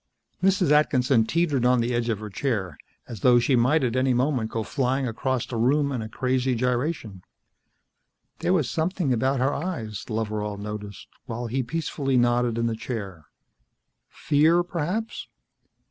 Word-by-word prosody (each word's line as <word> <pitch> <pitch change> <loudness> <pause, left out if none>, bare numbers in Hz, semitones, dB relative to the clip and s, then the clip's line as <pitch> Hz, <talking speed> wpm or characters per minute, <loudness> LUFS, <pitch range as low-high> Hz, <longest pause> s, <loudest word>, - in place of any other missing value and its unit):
Mrs. 190 -3 +3
Atkinson 130 -6 +3
teetered 155 -5 +1
on 125 0 +4
the 120 +1 0
edge 120 0 0
of 110 - 0
her 105 - -6
chair, 100 - -2 0.3
as 115 - -7
though 125 +4 +5
she 125 +3 +3
might 130 +6 +3
at 125 -1 0
any 130 -1 +2
moment 125 -3 0
go 115 -1 -2
flying 130 +1 -1
across 125 +2 -1
the 120 - -5
room 140 +5 +2
in 125 -4 -2
a 110 - -6
crazy 130 +2 0
gyration. 125 - -2 1.2
There - - 0
was - - +2
something 165 -3 0
about 130 +3 +1
her 135 +3 +1
eyes, 120 - -4
Loveral 105 -2 -2
noticed, 105 -1 -7 0.2
while 120 0 -4
he 125 +3 -1
peacefully 135 -1 -1
nodded 120 -1 +2
in 115 - 0
the 115 -1 0
chair. 100 - -6 0.8
Fear, 160 +4 +3
perhaps. 180 +7 -3
125 Hz, 160 wpm, -25 LUFS, 115-140 Hz, 1.2 s, though